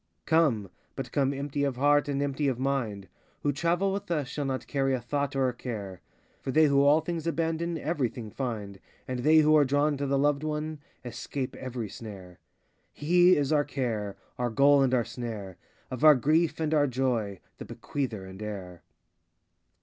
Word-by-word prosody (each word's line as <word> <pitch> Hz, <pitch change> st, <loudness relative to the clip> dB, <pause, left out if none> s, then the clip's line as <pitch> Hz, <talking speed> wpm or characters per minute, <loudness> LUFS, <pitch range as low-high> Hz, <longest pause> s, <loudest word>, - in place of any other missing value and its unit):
Come, 135 Hz, -, +2 dB, 0.2 s
but 130 Hz, -3 st, -5 dB
come 140 Hz, -1 st, +1 dB
empty 140 Hz, +1 st, -3 dB
of 140 Hz, -3 st, 0 dB
heart 145 Hz, +2 st, +3 dB
and 140 Hz, 0 st, -1 dB
empty 140 Hz, +1 st, -1 dB
of 130 Hz, -3 st, 0 dB
mind; 120 Hz, -7 st, -2 dB, 0.4 s
Who 145 Hz, -, +2 dB
travel 175 Hz, +7 st, 0 dB
with 200 Hz, -2 st, -5 dB
us 150 Hz, -6 st, -1 dB
shall 145 Hz, +2 st, -4 dB
not 130 Hz, -1 st, -3 dB
carry 135 Hz, -2 st, 0 dB
a -, -, -3 dB
thought 140 Hz, +3 st, -2 dB
or 135 Hz, -1 st, +2 dB
a 125 Hz, -, -1 dB
care; 105 Hz, -7 st, -6 dB, 0.4 s
For -, -, -6 dB
they 155 Hz, +4 st, +5 dB
who 140 Hz, -1 st, +4 dB
all 145 Hz, +3 st, +5 dB
things 170 Hz, -1 st, -4 dB
abandon, 165 Hz, 0 st, -1 dB
everything 125 Hz, -8 st, -3 dB
find, 105 Hz, -7 st, -5 dB, 0.3 s
And 130 Hz, -1 st, -3 dB
they 155 Hz, +5 st, +5 dB
who 155 Hz, 0 st, +5 dB
are 150 Hz, -, +6 dB
drawn 145 Hz, +2 st, +1 dB
to 140 Hz, 0 st, -2 dB
the 140 Hz, 0 st, +1 dB
loved 145 Hz, +1 st, +2 dB
One, 155 Hz, 0 st, -3 dB, 0.3 s
escape 130 Hz, +2 st, -5 dB
every 125 Hz, -4 st, -5 dB
snare. 95 Hz, -4 st, -10 dB, 0.5 s
He 175 Hz, +4 st, +4 dB
is 145 Hz, +1 st, +1 dB
our 145 Hz, -1 st, +3 dB
care, 110 Hz, -8 st, -3 dB, 0.2 s
Our 125 Hz, 0 st, 0 dB
goal 140 Hz, +4 st, +5 dB
and 135 Hz, -2 st, +3 dB
our 120 Hz, -2 st, +1 dB
snare; 105 Hz, -7 st, -6 dB, 0.3 s
Of 130 Hz, +1 st, -5 dB
our 155 Hz, -1 st, +9 dB
grief 155 Hz, +7 st, +1 dB
and 160 Hz, -1 st, 0 dB
our 145 Hz, -2 st, +4 dB
joy, 120 Hz, -7 st, -1 dB, 0.2 s
The -, -, -7 dB
bequeather 120 Hz, -9 st, -4 dB
and 95 Hz, +2 st, -10 dB
heir. 95 Hz, -5 st, -7 dB
135 Hz, 185 wpm, -28 LUFS, 120-150 Hz, 0.5 s, our